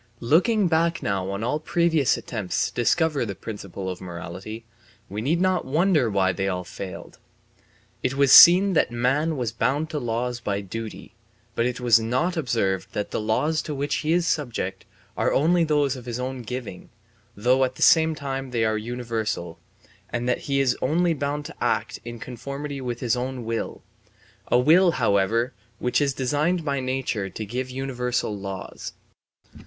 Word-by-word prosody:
Looking 185 Hz, -, +3 dB
back 165 Hz, +1 st, +1 dB
now 95 Hz, -2 st, -1 dB
on 100 Hz, +2 st, -3 dB
all 125 Hz, +6 st, 0 dB
previous 160 Hz, -3 st, +2 dB
attempts 105 Hz, -7 st, -2 dB
to -, -, -18 dB
discover 150 Hz, +4 st, +1 dB
the 100 Hz, -4 st, -4 dB
principle 100 Hz, -3 st, -7 dB
of 90 Hz, -1 st, -5 dB
morality, 90 Hz, +5 st, -7 dB, 0.4 s
we 105 Hz, +2 st, -4 dB
need 155 Hz, +8 st, +1 dB
not 185 Hz, 0 st, +2 dB
wonder 155 Hz, -2 st, +2 dB
why 95 Hz, -2 st, +2 dB
they 95 Hz, +1 st, -2 dB
all 90 Hz, -1 st, -2 dB
failed. 90 Hz, +1 st, -9 dB, 0.8 s
It 130 Hz, +1 st, -1 dB
was 140 Hz, -1 st, +3 dB
seen 185 Hz, +6 st, +9 dB
that 160 Hz, -, +3 dB
man 135 Hz, +7 st, 0 dB
was 120 Hz, -4 st, -1 dB
bound 135 Hz, +8 st, -1 dB
to 150 Hz, -, -2 dB
laws 120 Hz, 0 st, -2 dB
by 100 Hz, -4 st, -2 dB
duty, 110 Hz, +3 st, -7 dB, 0.4 s
but 115 Hz, -, +1 dB
it 125 Hz, 0 st, -3 dB
was 120 Hz, -2 st, +5 dB
not 130 Hz, +11 st, 0 dB
observed 110 Hz, -, -1 dB
that 105 Hz, -1 st, -3 dB
the -, -, -2 dB
laws 140 Hz, +9 st, +1 dB
to 150 Hz, -, -5 dB
which 140 Hz, +1 st, -1 dB
he 155 Hz, -, -1 dB
is 175 Hz, 0 st, +2 dB
subject 120 Hz, -, -2 dB, 0.3 s
are -, -, +1 dB
only 170 Hz, +4 st, +3 dB
those 145 Hz, -4 st, +1 dB
of 125 Hz, -2 st, -10 dB
his 120 Hz, 0 st, -3 dB
own 130 Hz, 0 st, -4 dB
giving, 120 Hz, -6 st, -7 dB, 0.5 s
though 125 Hz, +5 st, +3 dB
at 130 Hz, 0 st, -1 dB
the -, -, -1 dB
same 160 Hz, -1 st, +5 dB
time 135 Hz, -2 st, -4 dB
they 115 Hz, -2 st, 0 dB
are 110 Hz, 0 st, 0 dB
universal, 110 Hz, -7 st, -4 dB, 0.5 s
and 120 Hz, 0 st, -3 dB
that 125 Hz, -, +1 dB
he 140 Hz, 0 st, +2 dB
is 135 Hz, -2 st, +2 dB
only 170 Hz, +5 st, +2 dB
bound 145 Hz, 0 st, -3 dB
to -, -, -8 dB
act -, -, -1 dB
in 120 Hz, 0 st, -7 dB
conformity 140 Hz, +4 st, -6 dB
with 120 Hz, -2 st, -4 dB
his 120 Hz, -2 st, +1 dB
own 125 Hz, -1 st, -4 dB
will; 115 Hz, 0 st, -4 dB, 0.6 s
a -, -, +3 dB
will, 165 Hz, +7 st, +5 dB
however, 115 Hz, +2 st, +1 dB, 0.2 s
which 125 Hz, +5 st, 0 dB
is 140 Hz, -1 st, +2 dB
designed 150 Hz, +6 st, 0 dB
by 140 Hz, -2 st, 0 dB
nature 130 Hz, -6 st, -2 dB
to 110 Hz, +3 st, -6 dB
give 125 Hz, +5 st, -4 dB
universal 125 Hz, -4 st, -2 dB
laws. 95 Hz, -1 st, -7 dB
125 Hz, 175 wpm, -24 LUFS, 110-150 Hz, 0.8 s, seen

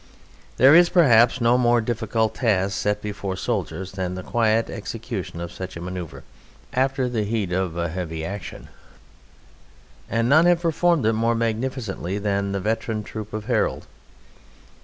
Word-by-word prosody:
There 135 Hz, +4 st, +7 dB
is 170 Hz, +1 st, +7 dB
perhaps 125 Hz, -8 st, +5 dB
no 120 Hz, +2 st, +4 dB
more 120 Hz, -1 st, +4 dB
difficult 110 Hz, -1 st, -1 dB
task 100 Hz, -5 st, +1 dB
set 105 Hz, 0 st, -1 dB
before 100 Hz, -2 st, -4 dB
soldiers 95 Hz, -3 st, -3 dB
than 90 Hz, -1 st, -4 dB
the 95 Hz, -, -6 dB
quiet 115 Hz, +1 st, +1 dB
execution 110 Hz, -5 st, -6 dB
of 85 Hz, 0 st, -5 dB
such 95 Hz, -1 st, -7 dB
a -, -, -7 dB
manoeuvre 90 Hz, -2 st, -7 dB, 0.5 s
after 130 Hz, 0 st, +1 dB
the 115 Hz, -3 st, -1 dB
heat 105 Hz, -3 st, -2 dB
of 90 Hz, -2 st, -1 dB
a 85 Hz, 0 st, 0 dB
heavy 80 Hz, -2 st, -4 dB
action, 100 Hz, 0 st, -7 dB, 1.4 s
and 115 Hz, +2 st, +1 dB
none 160 Hz, +6 st, +5 dB
have 175 Hz, -1 st, +3 dB
performed 170 Hz, -3 st, +2 dB
it 110 Hz, -, +3 dB
more 115 Hz, +1 st, +1 dB
magnificently 115 Hz, -4 st, -2 dB
than 100 Hz, -1 st, -1 dB
the 100 Hz, -, -1 dB
veteran 110 Hz, +1 st, -2 dB
troop 110 Hz, 0 st, -7 dB
of 105 Hz, 0 st, -5 dB
Harold. -, -, 0 dB
110 Hz, 155 wpm, -23 LUFS, 95-120 Hz, 1.4 s, There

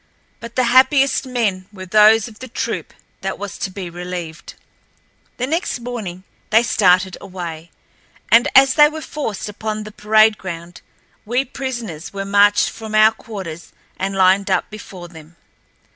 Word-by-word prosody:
But 235 Hz, 0 st, -10 dB
the 255 Hz, -, +2 dB
happiest 265 Hz, +3 st, +3 dB
men 210 Hz, -7 st, -1 dB
were 190 Hz, -2 st, -9 dB
those 215 Hz, +3 st, +5 dB
of 215 Hz, -2 st, -14 dB
the 255 Hz, -, -8 dB
troop 240 Hz, -, -4 dB, 0.3 s
that 195 Hz, 0 st, -3 dB
was 200 Hz, -2 st, -6 dB
to -, -, -2 dB
be 185 Hz, -1 st, -7 dB
relieved. 175 Hz, -1 st, -7 dB, 0.8 s
The 250 Hz, -, -1 dB
next 325 Hz, 0 st, -2 dB
morning 220 Hz, -7 st, -6 dB, 0.3 s
they 225 Hz, +2 st, +4 dB
started 185 Hz, -4 st, +2 dB
away, 170 Hz, -4 st, -7 dB, 0.6 s
and 230 Hz, +1 st, +6 dB
as 270 Hz, 0 st, +7 dB
they 295 Hz, +1 st, +6 dB
were 315 Hz, +1 st, -7 dB
forced 250 Hz, -11 st, -5 dB
upon 215 Hz, +1 st, -4 dB
the 215 Hz, -, -9 dB
parade 215 Hz, 0 st, +3 dB
ground 170 Hz, -1 st, -8 dB, 0.4 s
we 245 Hz, +5 st, 0 dB
prisoners 235 Hz, -, -6 dB
were 195 Hz, 0 st, -4 dB
marched 205 Hz, +1 st, +4 dB
from 220 Hz, -1 st, -7 dB
our 215 Hz, 0 st, +6 dB
quarters 190 Hz, -8 st, -9 dB, 0.2 s
and 195 Hz, +1 st, -3 dB
lined 190 Hz, +1 st, +3 dB
up -, -, 0 dB
before 190 Hz, -4 st, -10 dB
them. 160 Hz, -1 st, -15 dB
210 Hz, 155 wpm, -19 LUFS, 185-235 Hz, 0.8 s, as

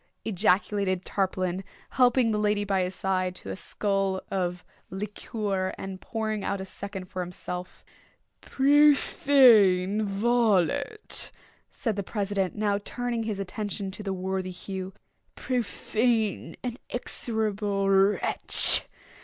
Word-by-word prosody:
ejaculated 190 Hz, -1 st, +1 dB
Tarpaulin, 185 Hz, -1 st, -1 dB, 0.3 s
helping 245 Hz, -2 st, +4 dB
the 210 Hz, -, 0 dB
lady 210 Hz, -1 st, +1 dB
by 195 Hz, -2 st, +1 dB
his 180 Hz, +1 st, -2 dB
side 185 Hz, -1 st, -1 dB
to -, -, -7 dB
a -, -, -4 dB
skull 195 Hz, -1 st, 0 dB
of 180 Hz, -2 st, -2 dB, 0.2 s
liqueur, 195 Hz, 0 st, -3 dB
and 190 Hz, -1 st, -7 dB
pouring 215 Hz, -2 st, -3 dB
out 200 Hz, -, -2 dB
a 190 Hz, -, -5 dB
second 195 Hz, -1 st, -6 dB
for 185 Hz, 0 st, -7 dB
himself. 180 Hz, 0 st, -6 dB, 0.6 s
"Profane 260 Hz, -8 st, +5 dB
varlet!" 215 Hz, -, +1 dB, 0.4 s
said 225 Hz, -4 st, -2 dB
the -, -, 0 dB
president, 200 Hz, -1 st, -2 dB
now 205 Hz, -1 st, 0 dB
turning 240 Hz, +2 st, -3 dB
his 210 Hz, -3 st, -3 dB
attention 200 Hz, 0 st, -4 dB
to 205 Hz, -, -7 dB
the 200 Hz, -2 st, -3 dB
worthy 190 Hz, 0 st, -2 dB
Hugh, 190 Hz, +1 st, -6 dB, 0.4 s
"profane 230 Hz, -2 st, -1 dB
and 245 Hz, -1 st, -4 dB
execrable 210 Hz, -5 st, -2 dB
wretch! 195 Hz, +1 st, +3 dB
200 Hz, 115 wpm, -27 LUFS, 190-220 Hz, 0.6 s, Profane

